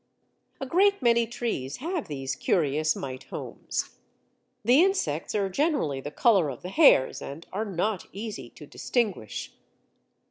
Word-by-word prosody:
A 270 Hz, -, -3 dB
great 390 Hz, +4 st, +3 dB
many 235 Hz, -1 st, +4 dB
trees 220 Hz, -, -3 dB
have 335 Hz, +2 st, -3 dB
these 135 Hz, -3 st, -4 dB
curious 155 Hz, -2 st, +1 dB
mite 130 Hz, -1 st, -6 dB
homes. -, -, -5 dB, 0.7 s
The 255 Hz, +8 st, +6 dB
insects 170 Hz, -, 0 dB
are 200 Hz, -2 st, +1 dB
generally 190 Hz, -, 0 dB
the 145 Hz, -, -5 dB
colour 190 Hz, -, +3 dB
of 130 Hz, +2 st, -8 dB
the 180 Hz, -, -5 dB
hairs, 165 Hz, -, +5 dB
and 145 Hz, +5 st, -8 dB
are 210 Hz, +3 st, -1 dB
not 200 Hz, 0 st, -2 dB
easy 210 Hz, +1 st, -6 dB
to -, -, -13 dB
distinguish. 205 Hz, -, -2 dB
200 Hz, 140 wpm, -27 LUFS, -, 0.7 s, The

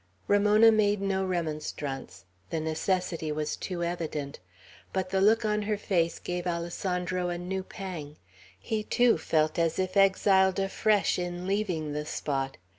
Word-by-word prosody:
Ramona 210 Hz, +2 st, +6 dB
made 210 Hz, -2 st, +2 dB
no 195 Hz, -1 st, 0 dB
remonstrance. 150 Hz, -, -4 dB, 0.2 s
The 165 Hz, -, -1 dB
necessity 160 Hz, 0 st, -1 dB
was 150 Hz, 0 st, -2 dB
too 175 Hz, -2 st, -4 dB
evident; 160 Hz, -5 st, -3 dB, 0.5 s
but 185 Hz, -1 st, -2 dB
the 190 Hz, 0 st, +2 dB
look 220 Hz, +3 st, +4 dB
on 210 Hz, 0 st, +1 dB
her 210 Hz, 0 st, -1 dB
face 170 Hz, -5 st, 0 dB
gave 180 Hz, 0 st, -4 dB
Alessandro 180 Hz, +1 st, -2 dB
a 175 Hz, -, -2 dB
new 185 Hz, +2 st, -3 dB
pang. 180 Hz, -6 st, -7 dB, 0.4 s
He, 215 Hz, -, -2 dB
too, 240 Hz, -4 st, +3 dB
felt 155 Hz, 0 st, +1 dB
as 165 Hz, -1 st, +1 dB
if 185 Hz, 0 st, -1 dB
exiled 190 Hz, -1 st, +4 dB
afresh 200 Hz, +1 st, +1 dB
in 175 Hz, 0 st, -4 dB
leaving 185 Hz, -7 st, -1 dB
the 150 Hz, 0 st, -4 dB
spot. 135 Hz, -3 st, -2 dB
180 Hz, 145 wpm, -28 LUFS, 160-195 Hz, 0.5 s, Ramona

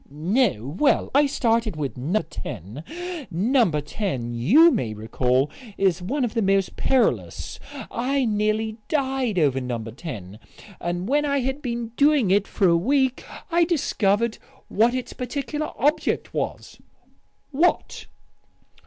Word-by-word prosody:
"No. 160 Hz, -, 0 dB
Well, 290 Hz, -, +2 dB
I 285 Hz, +1 st, +5 dB
started 230 Hz, -, +1 dB
with 145 Hz, -3 st, -3 dB
No. 165 Hz, +12 st, -1 dB
10. 105 Hz, -, -7 dB, 0.5 s
No. 225 Hz, +6 st, +2 dB
10 145 Hz, -, -3 dB
you 255 Hz, -, +6 dB
may 110 Hz, -, -2 dB
recall 125 Hz, +5 st, 0 dB, 0.3 s
is 190 Hz, -3 st, +2 dB
one 255 Hz, +9 st, -1 dB
of 225 Hz, -, -4 dB
the 230 Hz, -, 0 dB
most 195 Hz, -1 st, +1 dB
perilous. 265 Hz, -2 st, 0 dB, 0.3 s
I 265 Hz, +3 st, 0 dB
nearly 215 Hz, 0 st, 0 dB
died 265 Hz, -, 0 dB
over 140 Hz, -5 st, +2 dB
No. 125 Hz, -2 st, -3 dB
10. 110 Hz, -, -8 dB, 0.4 s
And 175 Hz, +2 st, -3 dB
when 290 Hz, +4 st, +2 dB
I 280 Hz, -2 st, +1 dB
had 265 Hz, +3 st, -2 dB
been 235 Hz, -3 st, -3 dB
doing 285 Hz, -8 st, +4 dB
it 200 Hz, +1 st, +3 dB
for 195 Hz, -, +2 dB
a 170 Hz, -, +5 dB
week 260 Hz, +8 st, +1 dB, 0.3 s
I 340 Hz, +1 st, +4 dB
discovered 235 Hz, -, +1 dB, 0.3 s
what 230 Hz, +4 st, +3 dB
its 255 Hz, -, -4 dB
particular 285 Hz, +4 st, -4 dB
object 295 Hz, +3 st, 0 dB
was." -, -, -4 dB, 0.7 s
"What?" 325 Hz, +6 st, 0 dB
215 Hz, 135 wpm, -24 LUFS, -, 0.7 s, you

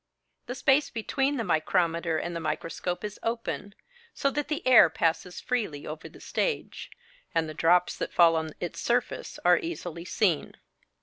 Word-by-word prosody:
The 245 Hz, -, -4 dB
space 275 Hz, +2 st, +3 dB
between 270 Hz, +5 st, -1 dB
the 230 Hz, -, -1 dB
micrometer 170 Hz, -2 st, +1 dB
and 170 Hz, +2 st, -3 dB
the -, -, -2 dB
microscope 165 Hz, +3 st, -3 dB
is 210 Hz, -1 st, -5 dB
open, 230 Hz, -3 st, -3 dB, 0.4 s
so 275 Hz, -, +1 dB
that 295 Hz, +1 st, -2 dB
the 300 Hz, -3 st, -3 dB
air 250 Hz, -9 st, +8 dB
passes 165 Hz, +3 st, -1 dB
freely 210 Hz, -, -2 dB
over 155 Hz, +3 st, -7 dB
the -, -, -15 dB
stage; 485 Hz, -, -3 dB, 0.5 s
and 165 Hz, -1 st, +2 dB
the 155 Hz, -, -6 dB
drops 175 Hz, +3 st, +3 dB
that -, -, -3 dB
fall 170 Hz, -1 st, +5 dB
on 160 Hz, -1 st, -3 dB
its 175 Hz, -, -5 dB
surface 240 Hz, +1 st, -1 dB
are -, -, +6 dB
easily 175 Hz, -, -6 dB
seen. 180 Hz, -4 st, 0 dB
180 Hz, 165 wpm, -28 LUFS, 165-245 Hz, 0.5 s, air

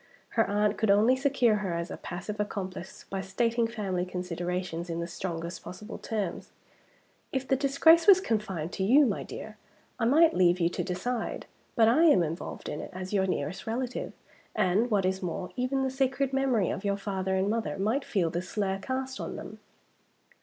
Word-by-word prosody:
Her 225 Hz, -, +2 dB
aunt 205 Hz, 0 st, +1 dB
could 220 Hz, -, +1 dB
only 215 Hz, +6 st, +5 dB
secure 260 Hz, -5 st, +2 dB
her 190 Hz, -5 st, -2 dB
as 170 Hz, 0 st, -3 dB
a -, -, -4 dB
passive 195 Hz, +4 st, -6 dB
accomplice 190 Hz, -3 st, -5 dB
by 195 Hz, 0 st, -2 dB
stating 230 Hz, +4 st, 0 dB
family 200 Hz, -6 st, -2 dB
considerations 180 Hz, -1 st, -4 dB
in 165 Hz, 0 st, -2 dB
the 170 Hz, -, -2 dB
strongest 170 Hz, 0 st, -5 dB
possible 210 Hz, +5 st, -8 dB
terms. 210 Hz, -6 st, -3 dB, 0.8 s
"If 265 Hz, -1 st, -2 dB
the 270 Hz, -, +3 dB
disgrace 290 Hz, +6 st, +5 dB
was 390 Hz, -2 st, +9 dB
confined 200 Hz, -, -2 dB
to 190 Hz, -, -2 dB
you, 270 Hz, +9 st, +6 dB
my 210 Hz, -6 st, -1 dB
dear, 215 Hz, 0 st, -8 dB, 0.4 s
I 230 Hz, -, +1 dB
might 315 Hz, +7 st, +5 dB
leave 180 Hz, 0 st, +4 dB
you 170 Hz, -1 st, +3 dB
to -, -, -3 dB
decide. 220 Hz, +6 st, -3 dB, 0.3 s
But 225 Hz, -1 st, +5 dB
I 290 Hz, +9 st, +5 dB
am 240 Hz, -, +6 dB
involved 165 Hz, +2 st, -5 dB
in 150 Hz, -, -4 dB
it, -, -, -7 dB
as 185 Hz, +2 st, -6 dB
your 190 Hz, -1 st, +2 dB
nearest 175 Hz, +1 st, -3 dB
relative; 245 Hz, +2 st, -3 dB, 0.4 s
and, 200 Hz, +7 st, +2 dB
what 200 Hz, -4 st, +2 dB
is 190 Hz, +1 st, 0 dB
more, 180 Hz, 0 st, -4 dB
even 260 Hz, +2 st, 0 dB
the 265 Hz, -, 0 dB
sacred 265 Hz, 0 st, 0 dB
memories 260 Hz, -8 st, +2 dB
of 190 Hz, -, -6 dB
your 200 Hz, -1 st, 0 dB
father 190 Hz, -1 st, -2 dB
and 190 Hz, +1 st, +1 dB
mother 220 Hz, -2 st, -1 dB
might 220 Hz, +8 st, 0 dB
feel 175 Hz, -10 st, 0 dB
the 175 Hz, -, -1 dB
slur 195 Hz, +1 st, -2 dB
cast 260 Hz, +3 st, -4 dB
on -, -, -5 dB
them." -, -, -8 dB
205 Hz, 190 wpm, -29 LUFS, 185-250 Hz, 0.8 s, was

